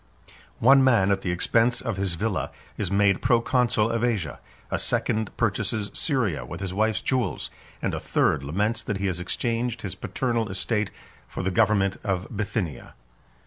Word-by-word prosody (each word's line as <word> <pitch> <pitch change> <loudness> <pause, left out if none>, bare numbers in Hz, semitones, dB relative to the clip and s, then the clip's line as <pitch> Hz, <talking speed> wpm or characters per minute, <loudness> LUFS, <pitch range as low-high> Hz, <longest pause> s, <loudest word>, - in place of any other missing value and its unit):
One 135 +3 +6
man, 115 -7 +4
at 95 -1 +1
the 95 - -2
expense 115 +7 +2
of 115 -6 -3
his 95 -3 0
villa, 105 +2 -1 0.3
is 100 - -2
made 100 -1 +3
proconsul 115 -2 +2
of 115 0 -1
Asia; 100 - -1 0.3
a - - 0
second 110 -1 0
purchases 105 -2 0
Syria 125 - 0
with - - -7
his 95 -2 -4
wife's 110 0 +1
jewels; 130 -3 -1 0.3
and - - 0
a - - -2
third 65 - +1
laments 105 - 0
that 105 - -3
he 100 - -2
has 90 -3 -1
exchanged 115 +5 -2
his 100 -3 -3
paternal 115 +2 -2
estate 105 +2 0 0.4
for - - -5
the 95 - 0
government 100 -1 +3
of 95 -3 -1
Bithynia. 100 - -3
105 Hz, 165 wpm, -25 LUFS, 95-115 Hz, 0.4 s, One